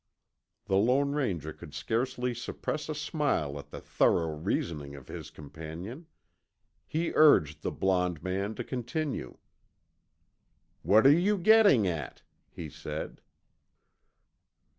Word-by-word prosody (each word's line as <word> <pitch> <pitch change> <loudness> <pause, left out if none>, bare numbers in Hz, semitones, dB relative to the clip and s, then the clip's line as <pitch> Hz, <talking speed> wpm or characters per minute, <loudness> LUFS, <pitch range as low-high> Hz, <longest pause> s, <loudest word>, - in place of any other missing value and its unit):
The 95 - +1
Lone 130 +7 +3
Ranger 90 - -2
could 75 - -12
scarcely 125 - -1
suppress 150 +5 -4
a 155 - -2
smile 140 - -1
at 70 0 -11
the - - -8
thorough 80 -2 +1
reasoning 75 -3 -3
of 70 - -12
his - - -7
companion. 80 - -9 0.8
He 165 +2 -1
urged 80 - +5
the - - -2
blond 90 -4 0
man 100 +3 -2
to 120 - -4
continue. 130 - -4 1.4
"What 110 +4 +4
are 135 - +9
you 185 +7 +3
getting 200 - +6
at?" 80 -7 -4 0.3
he 80 - -7
said. 75 - -7
100 Hz, 120 wpm, -29 LUFS, -, 1.4 s, are